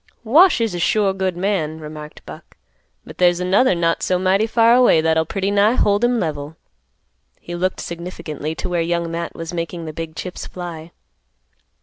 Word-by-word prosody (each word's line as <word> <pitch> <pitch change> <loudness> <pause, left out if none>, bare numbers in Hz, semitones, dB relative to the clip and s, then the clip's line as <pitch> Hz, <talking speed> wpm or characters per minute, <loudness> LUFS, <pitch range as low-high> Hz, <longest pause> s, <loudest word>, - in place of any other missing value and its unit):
"Wash 315 - +5
is 225 -4 0
a 175 - -3
sure 200 +2 +2
good 190 -2 -2
man," 175 -5 -1
remarked 150 0 -10
Buck, - - -12 0.5
"but - - -12
there's 175 -1 +4
another 190 +4 +3
not 165 -1 0
so 185 - +1
mighty 190 +4 +2
far 230 +1 +4
away 245 -9 +5
that'll 160 0 +1
pretty 195 +2 -2
nigh 205 +3 +4
hold, 205 -2 +2
him 240 0 +2
level." 155 -2 -4 0.8
He 175 - -9
looked 185 +2 -1
significantly 165 -3 -6
to - - -4
where 175 -2 0
Young 170 0 -1
Matt 170 0 -4
was 165 +1 -6
making 170 0 -4
the 155 - -6
big 160 0 -6
chips 180 +3 -6
fly. 170 -3 -8
175 Hz, 180 wpm, -20 LUFS, 165-200 Hz, 0.8 s, Wash